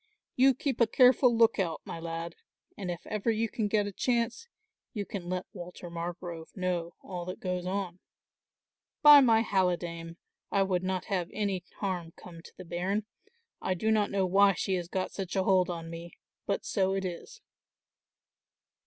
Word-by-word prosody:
You 265 +1 +5
keep 265 -3 -2
a 235 - +6
careful 250 0 +5
look 225 -2 +4
out, 170 -4 -1
my - - -6
lad, 165 0 -5 0.4
and 190 -3 -5
if 175 -1 -5
ever 215 +2 -2
you 225 0 +1
can 220 -1 -2
get 205 0 +2
a 205 - -4
chance 235 - -1 0.5
you 205 -4 -3
can 180 -4 -6
let 185 0 -2
Walter 175 -2 -9
Margrove 170 0 -6
know 175 -2 -2
all 180 -2 -5
that 185 +1 -6
goes 180 -1 -3
on. 185 -2 -3 1.0
By 295 -1 +11
my 225 -3 +5
halidame, 175 -4 -1 0.4
I 195 - +3
would 185 -2 0
not 185 0 -2
have 185 -4 -1
any 200 -4 -2 0.2
harm 180 -4 -2
come 170 -2 -12
to - - -15
the 185 - -9
bairn. 185 +5 -1 0.6
I 185 - 0
do 220 +5 0
not 210 -2 +2
know 195 -1 +1
why 195 +2 +5
she 190 +1 -2
has 175 -2 -1
got 185 +1 -2
such 190 -2 -5
a 190 - +2
hold 185 -1 +3
on 165 -1 -5
me, 170 +1 -8 0.3
but 200 - -1
so 190 -1 +1
it 195 -1 -2
is." 185 - -7
185 Hz, 180 wpm, -30 LUFS, 175-210 Hz, 1.0 s, By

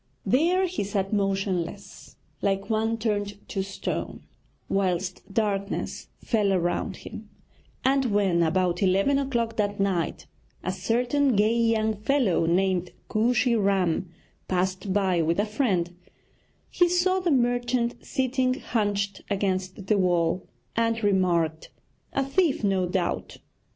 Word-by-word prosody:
There 350 +8 +3
he 365 - -2
sat 195 0 -2
motionless, 195 -2 -2 0.3
like 195 +1 0
one 225 +1 +1
turned 205 -2 -2
to 195 - -2
stone, 195 0 -4 0.4
whilst 185 0 -1
darkness 200 -2 -2 0.2
fell 210 -4 +2
around 175 -1 -1
him; - - -9 0.6
and 270 0 +3
when, 200 -6 +2
about 175 +1 +1
eleven 195 +9 +3
o'clock 235 -4 -1
that 205 -1 0
night, 190 -4 -1 0.4
a 185 - -1
certain 245 +7 +1
gay 215 +3 +3
young 225 -2 +2
fellow 215 - +1
named 180 0 +1 0.2
Kooshy 240 +2 +2
Ram 190 -4 +1 0.4
passed 185 +1 -1
by 185 -3 +2
with 165 +3 +1
a 205 - +3
friend, 195 -7 0 0.8
he 350 -1 +3
saw 365 +2 +2
the 360 -2 0
merchant 245 -2 +1
sitting 260 0 0
hunched 205 -6 -1
against 190 -1 -2
the 205 0 +2
wall, 175 -1 +1 0.3
and 230 0 +1
remarked: 175 -5 +1 0.4
'A 275 - +1
thief, 290 -2 +1
no 190 -3 +2
doubt.' 180 -1 -2
200 Hz, 125 wpm, -26 LUFS, 185-235 Hz, 0.8 s, There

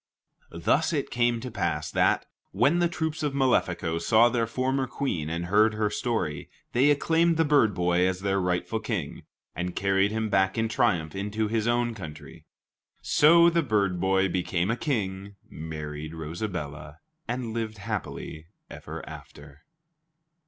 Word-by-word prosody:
Thus 140 - +1
it 145 -3 -2
came 120 -1 +1
to 125 0 -6
pass 110 - -2
that, - - +2 0.3
when 170 +5 +3
the 175 - +3
troops 160 -2 -3
of 145 -2 -1
Malefico 90 -11 +1
saw 110 +7 +4
their 115 -2 0
former 130 +2 -1
Queen 90 - -3
and 85 +1 -3
heard 105 +4 +3
her 105 -1 0
story, 105 - -2 0.2
they 130 +4 +4
acclaimed 165 +3 +2
the 165 - +3
bird 140 -9 +3
boy 90 +1 +2
as 95 0 -2
their 100 0 0
rightful 90 +5 -1
king, 105 -9 -4 0.3
and 90 +1 -4
carried 95 0 +2
him 110 +1 -2
back 95 -1 +1
in 115 0 +1
triumph 110 - 0
into 105 +2 -2
his 110 0 0
own 120 0 +1
country. 80 -4 -10 0.6
So 170 +3 +6
the 170 0 +2
bird 100 - 0
boy 95 +1 +2
became 90 +1 -1
a - - 0
king, 100 -7 -3
married 75 0 -7
Rosabella, 75 -3 -5 0.3
and 120 -2 -3
lived 110 -2 -3
happily 100 -6 -5 0.2
ever - - -8
after. 70 0 -12
105 Hz, 150 wpm, -27 LUFS, 90-120 Hz, 0.6 s, So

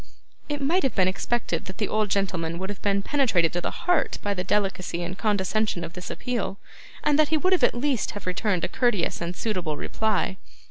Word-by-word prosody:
It 290 -1 -2
might 340 +7 +3
have 270 - 0
been 185 -2 +4
expected 235 +5 -1
that 190 - -7
the 210 - 0
old 215 -1 +1
gentleman 175 -5 0
would 190 +3 -3
have 205 - -8
been 200 -1 +1
penetrated 220 - +2
to 175 - -1
the - - -1 0.2
heart 355 -2 +2
by 205 - +1
the 180 -2 -2
delicacy 190 -3 0
and 180 +2 -4
condescension 205 -2 0
of 165 - -6
this 180 0 -7
appeal, 235 -5 -2 0.5
and 295 0 +3
that 305 - +6
he 315 - +3
would 370 +5 +3
at - - +4
least 260 -1 0
have 205 - -8
returned 185 0 0
a - - +2
courteous 240 -10 +1
and 170 +1 -3
suitable 180 -9 -2
reply. 210 -1 0
200 Hz, 205 wpm, -26 LUFS, 180-240 Hz, 0.5 s, that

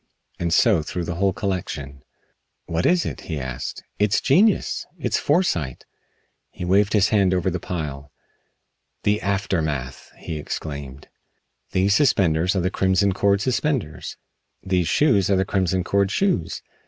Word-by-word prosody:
And 85 -1 -1
so 100 -1 +4
through 85 +3 -4
the 85 - -3
whole 95 +3 +1
collection. 75 -9 -4 0.6
"What 85 +1 0
is 180 -1 +3
it?" - - -5
he 80 -3 -2
asked. 65 -2 -5 0.2
"It's 105 -1 +3
genius! 190 +10 +2
It's - - -1
foresight." 90 - 0 0.6
He 90 - -7
waved 100 +3 +3
his 105 -1 +4
hand 95 -4 +3
over 90 +1 0
the 90 - -3
pile. 75 -5 -5 0.9
"The 105 +1 +1
aftermath!" 80 - -2
he 80 -2 -6
exclaimed. 70 -2 -6 0.6
"These 95 +2 +2
suspenders 90 - +2
are 95 - +1
the 90 +2 0
Crimson 95 +1 +2
Cord 100 +1 +2
suspenders. 130 - -2 0.5
These 90 -3 0
shoes 105 - +3
are 100 - +4
the 95 0 +1
Crimson 95 -2 0
Cord 100 +1 +1
shoes. 185 - 0
95 Hz, 140 wpm, -23 LUFS, 80-100 Hz, 0.9 s, so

